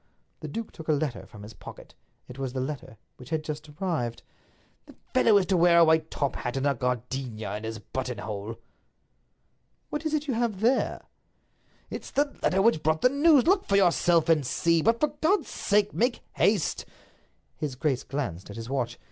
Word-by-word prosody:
The - - -6
duke 225 -1 -5
took 160 - -11
a 155 - +3
letter 145 -3 -2
from 105 -3 -12
his 105 +2 -10
pocket—it 120 - -14
was 130 -2 -3
the 130 - -2
letter 130 -4 -5 0.2
which 125 - -12
had 160 -1 -1
just 155 0 -6
arrived. 150 -8 -3 0.6
"The - - -15 0.2
fellow 215 -2 +5
is 195 - +2
to 185 0 +1
wear 170 0 +5
a 170 - +8
white 160 0 +3
top 140 -2 -2
hat, 125 +1 -3
and 135 - -1
a 140 - +3
gardenia 125 -4 -3
in 110 - -7
his 110 0 -4
buttonhole." 110 -2 -5 1.3
"What 300 - -3
is 315 -1 0
it 300 0 -1
you 265 - 0
have 225 -4 -1
there?" 245 +4 +1 0.9
"It's - - -6
the 285 0 0
letter 190 +1 +2
which 220 -8 +3
brought 155 0 +1
the 250 - +7
news—look 315 +6 +4
for 200 - +1
yourself 175 -3 +4
and 160 -3 +4
see; 165 +6 +2
but, 230 +6 +2
for 300 - +2
God's 395 +6 +2
sake, 205 0 +1
make 240 +2 0
haste!" 205 -6 +1 0.7
His 145 -4 -4
grace 135 -1 0
glanced 120 - -4
at 100 - -8
his 115 +2 -7
watch. 120 -3 -2
155 Hz, 185 wpm, -27 LUFS, 125-205 Hz, 1.3 s, a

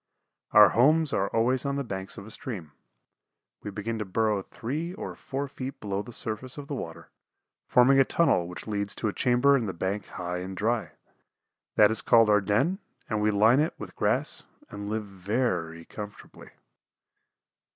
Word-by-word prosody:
Our 105 -1 +8
homes 150 +4 +4
are 95 - +1
always 120 +5 +1
on 140 -1 -1
the 140 - -1
banks 95 -4 -6
of 100 - -8
a 110 - -10
stream. 100 - -6 0.9
We - - -5
begin 105 +3 -4
to - - -1
burrow 105 +1 +1
three 155 - -5
or - - -6
four 140 +1 -4
feet 135 0 -7
below 100 -1 -2
the 120 - -10
surface 115 +4 -4
of 145 - -6
the 145 - -5
water, 80 -11 -7 0.6
forming 130 +2 +5
a - - +8
tunnel 130 - +2
which 90 -1 -8
leads 100 -2 -2
to 110 - -1
a - - -4
chamber 125 +3 +4
in 120 -5 0
the 95 - -3
bank 95 +4 -3
high 90 0 -4
and 95 +1 -6
dry. 110 +2 -1 0.8
That 105 0 +6
is 110 -1 0
called 115 -1 +5
our 105 -1 +5
den 110 - +1 0.3
and 110 -1 0
we 105 - +3
line 110 +5 +5
it 155 +2 0
with - - -9
grass - - 0 0.3
and 100 0 -6
live 110 0 -2
very 90 -4 -2
comfortably. 105 -1 -10
110 Hz, 180 wpm, -27 LUFS, 100-130 Hz, 0.9 s, Our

